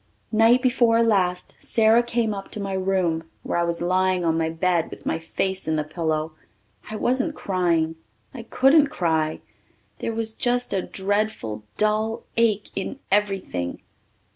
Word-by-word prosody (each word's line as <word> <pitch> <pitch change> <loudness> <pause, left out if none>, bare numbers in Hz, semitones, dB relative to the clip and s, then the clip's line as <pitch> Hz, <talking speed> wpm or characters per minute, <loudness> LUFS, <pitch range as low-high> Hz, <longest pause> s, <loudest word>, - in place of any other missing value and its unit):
Night 230 +3 +4
before 235 -2 +4
last 185 -5 +1
Sara 225 +1 +4
came 235 -2 -1
up 195 -1 -7
to - - -6
my 195 -1 -3
room 185 -4 0
where - - -1
I - - +2
was 170 0 0
lying 185 0 +1
on 165 -1 +2
my 165 0 0
bed 170 0 0
with - - -11
my 160 - -1
face 190 +2 -2
in 160 - +1
the 155 - 0
pillow. 155 0 -2 0.6
I 215 - -5
wasn't 260 +7 0
crying 170 -4 0 0.4
I 255 - -7
couldn't 270 +6 +4
cry. 160 - -1 0.6
There - - -2
was 225 -1 -1
just 245 +1 0
a 190 - +1
dreadful 190 - -2
dull 215 +1 0
ache 215 -3 +1
in 195 +7 -4
everything. 195 - -1
195 Hz, 155 wpm, -24 LUFS, 165-225 Hz, 0.6 s, Night